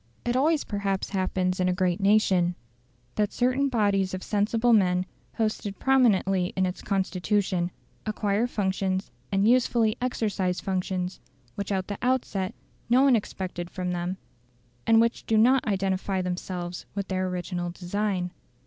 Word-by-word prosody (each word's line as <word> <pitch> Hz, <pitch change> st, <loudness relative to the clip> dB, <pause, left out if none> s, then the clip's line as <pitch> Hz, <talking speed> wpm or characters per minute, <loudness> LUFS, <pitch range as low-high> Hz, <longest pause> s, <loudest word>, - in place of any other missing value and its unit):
It 240 Hz, 0 st, 0 dB
always 300 Hz, +3 st, +3 dB
perhaps 200 Hz, -2 st, -2 dB
happens 185 Hz, -1 st, 0 dB
in 185 Hz, 0 st, +2 dB
a -, -, +2 dB
great 180 Hz, -1 st, 0 dB
nation, 195 Hz, -4 st, +3 dB, 0.6 s
that 210 Hz, -1 st, 0 dB
certain 255 Hz, +3 st, +1 dB
bodies 200 Hz, -5 st, +1 dB
of 185 Hz, -, -7 dB
sensible 225 Hz, +3 st, +2 dB
men 180 Hz, -3 st, +3 dB, 0.3 s
posted 215 Hz, -3 st, -2 dB
prominently 195 Hz, -8 st, +3 dB
in 190 Hz, -, +2 dB
its 180 Hz, 0 st, -4 dB
Constitution, 190 Hz, -1 st, 0 dB, 0.4 s
acquire 215 Hz, +1 st, 0 dB
functions, 190 Hz, -3 st, -1 dB, 0.2 s
and 195 Hz, +1 st, +3 dB
usefully 235 Hz, -2 st, +3 dB
exercise 205 Hz, -7 st, -1 dB
functions, 185 Hz, -1 st, -2 dB, 0.3 s
which 200 Hz, 0 st, -4 dB
at 190 Hz, -1 st, -1 dB
the 205 Hz, -, -5 dB
outset, 235 Hz, -6 st, 0 dB, 0.3 s
no 250 Hz, +3 st, +5 dB
one 275 Hz, -3 st, +6 dB
expected 185 Hz, -5 st, -4 dB
from 180 Hz, -1 st, -3 dB
them, 175 Hz, +1 st, -2 dB, 0.7 s
and 225 Hz, 0 st, +6 dB
which 230 Hz, +1 st, +1 dB
do 220 Hz, -, +3 dB
not 250 Hz, +4 st, +4 dB
identify 195 Hz, -1 st, 0 dB
themselves 180 Hz, -1 st, -4 dB
with 200 Hz, -1 st, -2 dB
their 185 Hz, 0 st, -1 dB
original 180 Hz, -1 st, -3 dB
design. 180 Hz, +1 st, -2 dB
195 Hz, 140 wpm, -26 LUFS, 185-220 Hz, 0.7 s, one